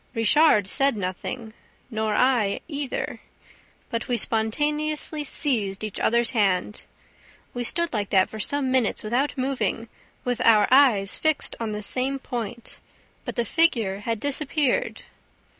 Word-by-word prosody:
Richard 225 -2 +4
said 275 +3 +2
nothing, 205 +4 -5 0.4
nor 220 -1 -1
I 245 -6 +2
either. 285 -4 -4 0.7
But 230 +1 -3
we 245 -2 0
spontaneously 295 +8 -1
seized 220 -10 +1
each 215 -2 -5
other's 235 0 +2
hand. 205 -3 0 0.7
We 245 - -3
stood 340 +5 +2
like 205 -3 -2
that 190 -2 +3
for 220 - -9
some 275 +3 0
minutes, 255 -5 +1
without 250 +7 -1
moving, 255 -3 -2 0.4
with 245 -1 -1
our 220 -3 +5
eyes 240 -8 +4
fixed 315 -1 0
on 225 -2 -3
the 210 0 -5
same 260 +5 -1
point; 240 -3 -6 0.5
but - - -5
the 235 - 0
figure 225 -10 +1
had 225 +1 -3
disappeared. 290 - 0
235 Hz, 135 wpm, -24 LUFS, 215-280 Hz, 0.7 s, our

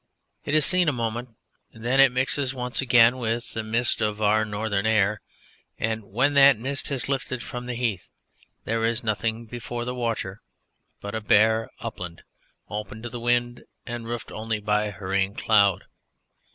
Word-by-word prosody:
It 150 - 0
is 155 - +5
seen 180 -2 +4
a - - +2
moment 120 0 -3 0.4
then 120 +4 -1
it 135 -2 +7
mixes 130 +1 0
once 125 +1 -2
again 120 -1 +5
with 115 0 -2
the 110 - -2
mist 115 +2 0
of 105 -1 -1
our 110 +1 +3
northern 105 0 -1
air, 105 -1 +2 0.6
and 110 0 -2
when 120 +9 +1
that 140 -2 +7
mist 135 +4 -3
has 135 -3 0
lifted 130 -2 -2
from 125 0 -7
the 125 - -3
heath 115 -7 -2 0.5
there 115 0 -1
is 115 +2 0
nothing 115 +1 -1
before 120 +1 -5
the 125 - -3
watcher 115 -5 -3 0.6
but 100 - -6
a 110 - -2
bare 110 +2 +3
upland 90 -2 -7 0.4
open 105 +1 -6
to 120 - -4
the 120 +1 -6
wind 120 0 0 0.2
and 120 -1 -6
roofed 120 0 -5
only 110 0 -3
by 105 0 0
hurrying 95 0 -2
cloud. 100 -4 +3
115 Hz, 165 wpm, -25 LUFS, 105-125 Hz, 0.6 s, it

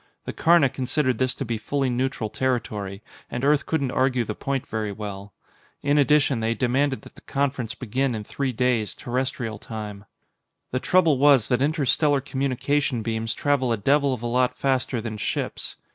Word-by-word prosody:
The - - -4
Karna 165 -3 +5
considered 130 -1 -1
this 130 0 +1
to 135 - -4
be 115 -2 -2
fully 140 +4 -1
neutral 125 -3 -1
territory, 105 -6 -2 0.3
and 125 +3 -2
Earth 145 0 +3
couldn't 140 -5 0
argue 130 -2 +2
the 105 - -3
point 135 +3 -3
very 110 -2 -3
well. 100 -1 -7 0.5
In 145 +1 +3
addition, 145 -3 +3
they 115 +1 0
demanded 130 +3 +1
that - - -13
the - - -16
conference 135 -4 -2
begin 130 +1 -1
in 105 - -4
three 135 +5 -2
days, 120 -3 0
Terrestrial 125 -4 -3
time. 105 -2 -7 0.7
The 130 - 0
trouble 165 -3 +3
was 140 -5 +5
that 125 -1 +2
interstellar 145 0 +2
communication 135 -1 -1
beams 115 +1 -2
travel 140 -4 +1
a 115 - +1
devil 140 +6 +3
of 125 -3 -4
a - - -2
lot 125 +1 +1
faster 130 -3 0
than 110 -1 -5
ships. - - -3
130 Hz, 175 wpm, -24 LUFS, 115-140 Hz, 0.7 s, Karna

